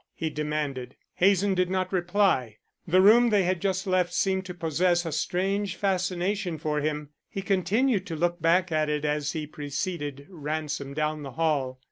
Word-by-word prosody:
he 160 -2 -3
demanded. 150 -4 -3 0.2
Hazen 195 +1 +3
did 185 -1 +1
not 185 0 -1
reply. 175 - +1 0.3
The 185 +3 +4
room 235 +4 +7
they 205 -3 +3
had 180 -1 0
just 190 -1 0
left 180 -2 +1
seemed 190 0 +1
to 180 -1 -7
possess 175 +1 +1
a 165 - -3
strange 190 +5 -1
fascination 185 -1 -1
for 150 -1 -1
him. 150 -1 -2 0.2
He 195 - -5
continued 200 +3 +1
to 165 - -4
look 175 +1 -1
back 175 +3 +3
at 155 -1 +1
it 150 0 -1
as 150 0 -1
he 155 -2 -3
preceded 145 -1 -4
Ransom 150 -4 -4
down 155 0 -1
the 135 -3 -7
hall. 140 -5 0
175 Hz, 170 wpm, -27 LUFS, 150-190 Hz, 0.3 s, room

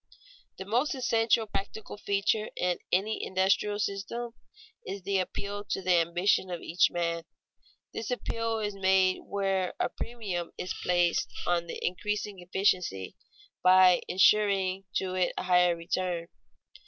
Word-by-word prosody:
_ - - -51
The 190 - -6
most 245 +9 +1
essential 230 -3 +2
practical 210 +1 -5
feature 205 +1 0
in 180 -1 0
any 200 +4 +1
industrial 195 +2 +1
system 210 +4 -3 0.5
is 195 0 -6
the 195 0 +1
appeal 200 +2 -4
to - - -2
the 180 -2 +3
ambition 175 +3 +2
of 175 -1 -4
each 170 +2 +2
man. 170 -1 -2 0.7
This 225 - -4
appeal 230 -2 -2
is 210 -1 -2
made 190 -1 +3
where 195 -2 -1
a - - +1
premium 200 -8 -5
is 185 - -3
placed 175 -1 +1
on 170 -1 0
increasing 205 +3 -3
efficiency, 180 - 0 0.5
by 185 -1 +6
insuring 195 0 +3
to 185 -1 -1
it 185 -1 +1
a - - -2
higher 180 -1 +4
return. 170 0 -2
190 Hz, 135 wpm, -29 LUFS, 180-205 Hz, 0.7 s, by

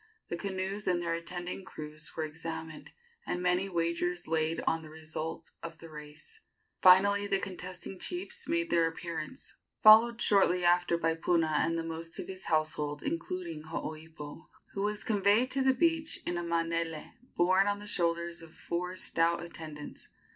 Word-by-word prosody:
The - - -2
canoes 190 +2 -3
and 180 -1 +3
their 170 -1 -1
attending 175 +2 -5
crews 155 -3 -8
were 160 - 0
examined, 160 0 -6 0.4
and 180 - -1
many 180 +2 +1
wagers 175 0 -1
laid 160 0 +1
on 165 - +1
the 155 - -11
result 160 0 -5
of 165 -1 -7
the 165 +1 -12
race. 150 - -10 0.4
Finally 200 +2 +6
the 195 - +2
contesting 185 -1 -6
chiefs 390 +6 -3
made 335 0 0
their 165 -1 +4
appearance, 165 +6 -6 0.3
followed 225 +2 +8
shortly 185 -5 +4
after 175 -1 +4
by 165 -1 +1
Puna 165 -1 +1
and 165 0 +1
the 165 - -1
most 165 0 -5
of - - -5
his 190 0 -5
household, 150 -2 0
including 165 -2 -4
Hooipo, 160 -1 -7 0.3
who 195 - -3
was 210 +1 -1
conveyed 210 +4 +3
to 270 - +3
the 265 0 +5
beach 330 +2 +3
in 175 - -1
a 175 - -2
manele 165 -1 -1 0.2
borne 185 +3 +4
on 205 0 +1
the 205 - -9
shoulders 170 -3 0
of 165 -1 -13
four 180 +2 -3
stout 170 -2 +1
attendants. 155 -3 -8
170 Hz, 160 wpm, -31 LUFS, 160-190 Hz, 0.4 s, followed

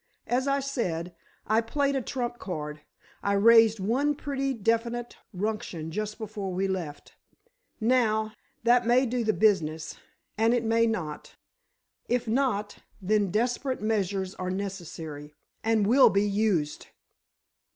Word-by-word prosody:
As 255 +3 0
I 275 0 +2
said, 180 - -3 0.3
I 220 +2 +3
played 280 +4 0
a 270 - 0
trump 240 -1 -4
card—I 155 +3 -6
raised 225 +1 +6
one 265 +9 +1
pretty 275 -1 -2
definite 230 +1 -1
ruction 185 -5 -3
just 215 +3 -3
before 210 -3 -5
we 190 +2 0
left. 170 -6 -5 0.7
Now, 220 -2 +2 0.3
that 240 0 +4
may 250 +2 +4
do 245 0 -1
the 220 - +2
business—and, 205 +4 0
it 240 - 0
may 230 +1 +3
not! 165 -10 -4 0.7
If 245 -1 0
not, 220 -4 0 0.2
then 205 +1 +1
desperate 245 +4 -1
measures 195 -3 -1
are 185 -1 -4
necessary—and 185 +2 -4
will 255 +6 +6
be 200 +1 +2
used!" 200 -7 0
215 Hz, 120 wpm, -27 LUFS, 190-240 Hz, 0.7 s, raised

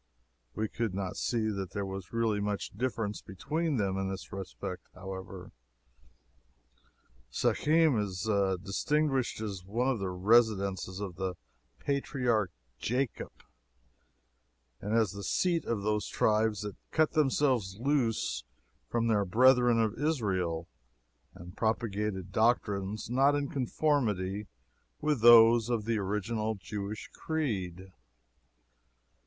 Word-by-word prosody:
We 110 - -1
could 110 -3 -3
not 95 -2 -3
see 110 -2 0
that 100 -3 -4
there 100 -1 -2
was 95 -1 -7
really 115 -3 +1
much 105 0 -2
difference 115 -3 -2
between 150 - -2
them 95 -3 0
in 95 0 -1
this 95 - -7
respect, 95 -1 -6
however. 95 0 -8 1.8
Shechem 155 - +3
is 95 -3 -3 0.4
distinguished 135 +4 0
as 100 -4 -4
one 115 +7 0
of 130 -5 0
the 95 -1 -2
residences 100 -1 +2
of 95 -4 -5
the 95 -1 -2 0.4
patriarch 125 - 0 0.3
Jacob, 125 +1 -2 1.5
and 105 +2 -1
as 110 -4 +2
the 100 0 -7
seat 170 - +1
of 110 -4 -2
those 105 0 0
tribes 110 -1 +1
that 105 -1 -6
cut 155 -2 +2
themselves 130 - +1
loose 130 -4 0 0.5
from 115 -1 0
their 110 -3 +3
brethren 120 +4 +5
of 110 +1 0
Israel 95 - -1 0.7
and 90 +2 -11
propagated 105 -4 -1
doctrines 105 -2 +1
not 135 +5 +3
in 145 -1 -1
conformity 110 -8 0 0.5
with 150 -6 0
those 115 0 +8
of 115 -4 0
the 115 -1 0
original 105 +2 -1
Jewish 100 +1 -6
creed. 95 - -3
110 Hz, 115 wpm, -30 LUFS, 95-125 Hz, 1.8 s, those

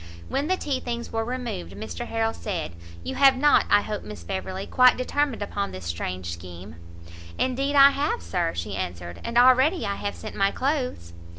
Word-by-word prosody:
When 285 +2 -1
the 370 +1 +1
tea 280 -6 -2
things 235 -1 -5
were 225 0 0
removed, 235 -6 -4
Mr 235 +2 -6
Harrel 225 0 0
said, 180 - -4 0.3
"You - - -4
have 270 -1 +5
not, 295 +2 +4
I 205 - +6
hope, 210 0 -4
Miss 210 - -9
Beverley, 190 0 -4
quite 255 0 +5
determined 255 -2 -1
upon 200 0 -3
this 95 -2 -8
strange 85 +1 -4
scheme?" 85 +1 -10 0.6
"Indeed 270 +3 0
I 280 0 +9
have, 280 - -1
Sir," 85 -1 -1
she 90 +4 -4
answered, 85 -2 -5
"and 235 0 -2
already 260 +5 +5
I 200 -1 -2
have 205 - -3
sent - - -8
my 195 0 +3
clothes." 255 - -2
225 Hz, 185 wpm, -25 LUFS, -, 0.6 s, I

